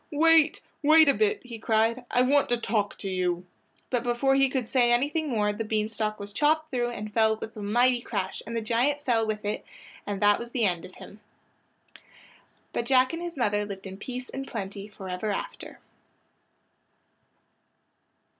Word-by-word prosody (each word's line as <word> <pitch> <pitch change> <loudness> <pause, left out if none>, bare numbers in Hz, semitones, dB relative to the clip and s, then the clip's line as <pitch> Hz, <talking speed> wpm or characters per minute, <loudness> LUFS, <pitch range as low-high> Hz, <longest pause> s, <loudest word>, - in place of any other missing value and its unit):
"Wait! 320 +1 +4 0.2
wait 310 +1 +6
a 280 - +6
bit!" 430 +3 +1
he 235 -2 -8
cried, 225 +3 +1
"I 250 - +3
want 280 +2 +3
to 240 - +2
talk 215 -3 -1
to 200 - -6
you!" 180 -1 -1 0.5
But 245 -2 +1
before 245 +3 +1
he 270 0 +4
could 255 -3 -2
say 245 -1 +3
anything 290 +6 +1
more 210 -4 +1
the 215 +2 -3
bean 215 0 -1
stalk 215 -1 -3
was 200 0 -7
chopped 310 +4 +1
through 240 -2 0
and 215 -3 -6
fell 220 -1 +3
with 220 0 -8
a 215 - -7
mighty 240 +4 +2
crash, 200 -5 -3
and 230 0 -3
as 225 - -2
the - - -14
giant 275 +6 +1
fell 225 -4 +1
with 215 -1 -3
it 210 - -2 0.4
that 205 0 +2
was 235 0 -7
the 235 -2 0
end 180 -2 -1
of 185 - -13
him. 210 - -12 1.5
But 235 - -2
Jack 255 +2 +4
and 330 - -4
his 345 -3 -6
mother 210 -4 +1
lived 200 -1 -7
in 190 0 -7
peace 250 +4 -6
and 270 0 -6
plenty 200 -2 -6
forever 190 0 -5
after. 200 - -5
230 Hz, 185 wpm, -27 LUFS, 210-260 Hz, 1.5 s, wait